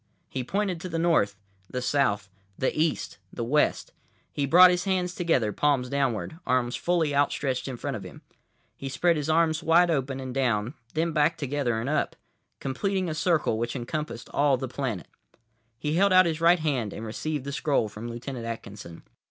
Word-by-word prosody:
He 130 - -3
pointed 190 +3 -1
to 185 - -5
the 165 - -2
north, 165 -12 +2 0.3
the 125 - -3
south, 125 -7 +1 0.3
the 130 - 0
east, 155 0 -1
the 120 - -4
west. 145 +6 +1 0.4
He 140 -1 -1
brought 180 +5 +8
his 180 +1 -1
hands 180 -2 0
together, 135 - +1
palms 140 -4 +1
downward, 140 +3 -1
arms 125 -1 +1
fully 170 -4 +1
out 140 0 +3
stretched 130 -2 -2
in 130 -2 -5
front 140 +2 -3
of 105 - -5
him. - - -11 0.5
He 135 - -6
spread 170 +6 +2
his 150 0 -2
arms 160 0 +3
wide 170 +2 +4
open 135 -3 -1
and 130 -1 -5
down, 120 -3 0 0.2
then 165 +2 +1
back 155 +1 +2
together 135 -5 -1
and 115 - -3
up; 150 - 0 0.4
completing 185 +7 -1
a - - -2
circle 155 -8 +1
which 120 +2 -2
encompassed 130 -1 -4
all 140 -2 +3
the 130 +1 -4
planet. 125 -6 -4 0.7
He 150 +5 -2
held 200 +1 +4
out 185 0 +7
his 165 -1 -1
right 170 +2 +6
hand 135 - -1
and 110 - -6
received 145 +6 -3
the 140 - -4
scroll 140 -6 +1
from 105 +3 -7
Lieutenant 120 +1 -6
Atkinson. 100 -6 -8
140 Hz, 185 wpm, -27 LUFS, 125-165 Hz, 0.7 s, brought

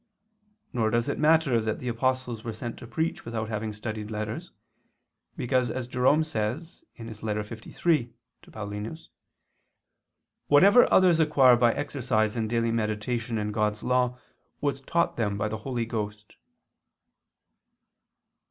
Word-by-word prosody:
Nor 115 -3 +1
does 115 +1 +1
it - - -2
matter 150 -6 +4
that 110 0 -2
the 125 - -7
apostles 125 -1 -1
were 115 - -4
sent 120 +1 -5
to 120 - -10
preach 160 +8 -2
without 110 -2 -4
having 110 0 -3
studied 110 0 -5
letters, 110 0 -4 0.9
because, 125 0 +1
as 130 0 -3
Jerome 130 +5 +3
says 155 - -4
(Ep. 115 - -8
liii 110 +6 -2 0.4
ad - - -15
Paulin.), 105 +6 -5 1.5
"whatever 200 +11 +6
others 180 -3 +5
acquire 145 -5 +6
by 120 0 +4
exercise 125 -7 0
and 110 -2 -1
daily 115 0 +1
meditation 115 +1 -2
in 105 0 -2
God's 105 0 -1
law, 125 0 +1 0.4
was 140 -2 -1
taught 170 +5 0
them 105 -4 0
by 105 +1 -1
the 110 +1 -3
Holy 120 0 -3
Ghost." 105 -2 -5
115 Hz, 135 wpm, -27 LUFS, 110-130 Hz, 1.5 s, whatever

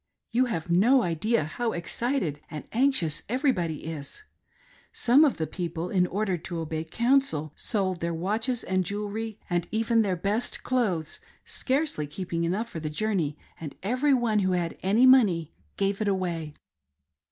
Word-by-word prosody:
You 250 +3 +3
have 175 -10 -3
no 235 +9 +5
idea 175 +5 +1
how 225 +10 -2
excited 175 - -1
and 155 -2 -6
anxious 240 - +2
everybody 210 - 0
is. 160 - -6 0.7
Some 255 +6 +5
of 290 - +2
the 160 - -1
people, 170 0 -4
in 180 -2 +3
order 195 -1 -1
to 170 +1 -6
obey 160 0 -3
counsel, 230 - +1
sold 190 -5 -1
their 170 0 -1
watches 220 +8 -1
and 185 0 0
jewelry, 210 +3 -4
and 175 -2 -1
even 225 +1 +2
their 195 -4 +1
best 205 +7 -1
clothes, 195 -11 0 0.3
scarcely 265 - -1
keeping 170 +1 -3
enough 200 +7 -1
for 170 - -6
the 155 -1 -3
journey, 160 -3 -1 0.2
and 155 -4 -7
every 255 +7 +2
one 230 -4 +1
who 185 -2 +1
had 175 -2 -1
any 210 +7 +4
money 200 - +5 0.2
gave 200 +1 0
it 215 - 0
away. 170 -6 -2
190 Hz, 155 wpm, -27 LUFS, 165-235 Hz, 0.7 s, no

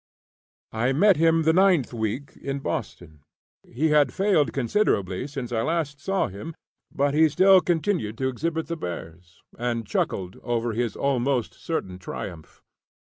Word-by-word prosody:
I 120 +4 0
met 195 +5 +5
him 165 0 +3
the 160 +1 +4
ninth 180 -8 +3
week 115 +5 -3
in 140 0 -3
Boston. 85 - -5 0.4
He 155 +7 -1
had 150 -4 +4
failed 190 -7 +2
considerably 120 - 0
since 135 -4 -6
I 115 -2 0
last 155 0 -1
saw 195 +6 0
him, 105 - -8 0.4
but 140 0 0
he 160 +1 +5
still 190 +4 +6
continued 165 - -1
to 130 - 0
exhibit 160 +5 -2
the 170 - -4
bears 85 - -8 0.2
and 120 -1 -2
chuckled 95 -1 -2
over 120 -1 -1
his 115 -1 -1
almost 135 -3 0
certain 95 - -4
triumph. 85 -3 -8
135 Hz, 145 wpm, -25 LUFS, 110-160 Hz, 0.4 s, still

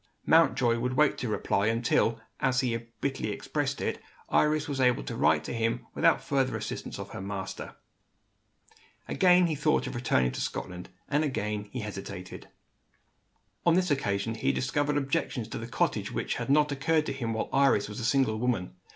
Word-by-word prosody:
Mountjoy 130 -7 +4
would 125 +2 -1
wait 150 +2 +4
to 125 - -2
reply, 105 -1 0
until, 115 0 +2 0.2
as 130 -1 +2
he 120 -3 0 0.3
bitterly 135 -6 -1
expressed 135 +6 -2
it, - - -2 0.3
Iris 150 0 +2
was 140 -2 -2
able 125 -1 +3
to - - -5
write 80 -1 +3
to - - -5
him 115 0 -1
without - - +2
the 135 -2 +1
assistance - - -5
of - - -7
her - - -6
master. 95 -1 -5 1.3
Again 180 -1 +5
he 165 - 0
thought 150 +1 +1
of - - -5
returning 65 - +1
to - - -4
Scotland 90 0 -5 0.2
and, 145 +2 +1
again, 105 -7 -2
he 125 - -4
hesitated. 95 -3 -7 1.2
On 170 -1 +4
this 180 -2 +2
occasion, 105 -5 0
he 110 - 0
discovered 145 +2 0
objections 135 -4 -1
to - - -5
the 115 - -6
cottage 115 - -1
which - - -2
had - - -4
not 150 +1 +4
occurred 155 +3 +1
to - - -2
him 120 -4 -3
while 110 - -2
Iris 135 -6 +4
was 105 +2 -7
a - - -4
single 115 -3 +2
woman. 115 -7 -1
125 Hz, 175 wpm, -29 LUFS, 110-145 Hz, 1.3 s, Again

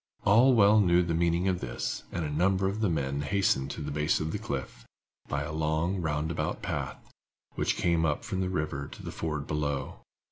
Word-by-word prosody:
All 120 +6 +6
well 105 0 +6
knew 90 -3 +4
the 85 -1 -1
meaning 85 +2 +1
of 90 -2 +1
this, 60 -2 -4
and 85 -2 -2
a 75 - -3
number 95 +5 +2
of 100 +3 -2
the 110 -3 +2
men 70 -3 -1
hastened 75 -5 +1
to 70 - -6
the 75 0 -4
base 75 +1 +1
of 80 0 -2
the 105 - -3
cliff, 70 - -5 0.5
by 70 0 -1
a 75 - -5
long, 80 +4 0
roundabout 80 0 -2
path, - - -3 0.6
which - - 0
came 85 -2 +2
up 75 -3 0
from 95 - -2
the 90 - -1
river 75 -6 -2
at - - -9
the - - -4
ford 75 -3 -3
below. 75 -2 -2
80 Hz, 205 wpm, -29 LUFS, 75-95 Hz, 0.6 s, All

